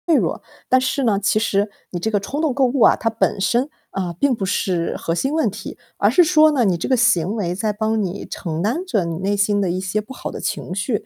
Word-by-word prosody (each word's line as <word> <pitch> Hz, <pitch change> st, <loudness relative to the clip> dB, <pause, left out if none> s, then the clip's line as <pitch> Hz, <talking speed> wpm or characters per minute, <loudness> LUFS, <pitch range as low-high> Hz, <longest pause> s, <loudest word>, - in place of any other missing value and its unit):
弱。 -, -, 0 dB, 0.3 s
但 255 Hz, -, +5 dB
是 260 Hz, +1 st, -1 dB
呢， 205 Hz, -4 st, +2 dB
其 215 Hz, +1 st, +2 dB
实 205 Hz, -1 st, 0 dB, 0.2 s
你 175 Hz, -, -4 dB
这 220 Hz, +5 st, -2 dB
个 205 Hz, -, +2 dB
冲 275 Hz, +9 st, -5 dB
动 310 Hz, -5 st, +1 dB
购 270 Hz, 0 st, +2 dB
物 255 Hz, 0 st, 0 dB
啊， -, -, +7 dB
它 225 Hz, -, -1 dB
本 220 Hz, -3 st, -1 dB
身， 245 Hz, +7 st, +1 dB, 0.3 s
嗯， 180 Hz, -3 st, -2 dB
并 275 Hz, -3 st, +2 dB
不 195 Hz, -, -3 dB
是 180 Hz, -3 st, -1 dB
核 165 Hz, -, -2 dB
心 270 Hz, -, -1 dB
问 320 Hz, -, +2 dB
题。 -, -, -8 dB, 0.2 s
而 -, -, +3 dB
是 355 Hz, -, +6 dB
说 310 Hz, -1 st, +5 dB
呢， 260 Hz, -5 st, +2 dB
你 180 Hz, -4 st, +2 dB
这 -, -, -4 dB
个 260 Hz, -, +3 dB
行 215 Hz, -6 st, +2 dB
为 180 Hz, -5 st, -2 dB
在 210 Hz, +1 st, -1 dB
帮 220 Hz, +1 st, 0 dB
你 190 Hz, +2 st, -4 dB
承 165 Hz, -3 st, -4 dB
担 255 Hz, -, -1 dB
着 205 Hz, -, 0 dB
你 165 Hz, -1 st, -3 dB
内 200 Hz, +2 st, -1 dB
心 205 Hz, 0 st, +2 dB
的 190 Hz, -3 st, 0 dB
一 185 Hz, +1 st, -2 dB
些 190 Hz, +3 st, -1 dB
不 215 Hz, +5 st, -8 dB
好 -, -, -6 dB
的 -, -, -7 dB
情 180 Hz, -, -4 dB
绪。 210 Hz, +2 st, -2 dB
210 Hz, 275 characters per minute, -20 LUFS, 190-255 Hz, 0.3 s, 啊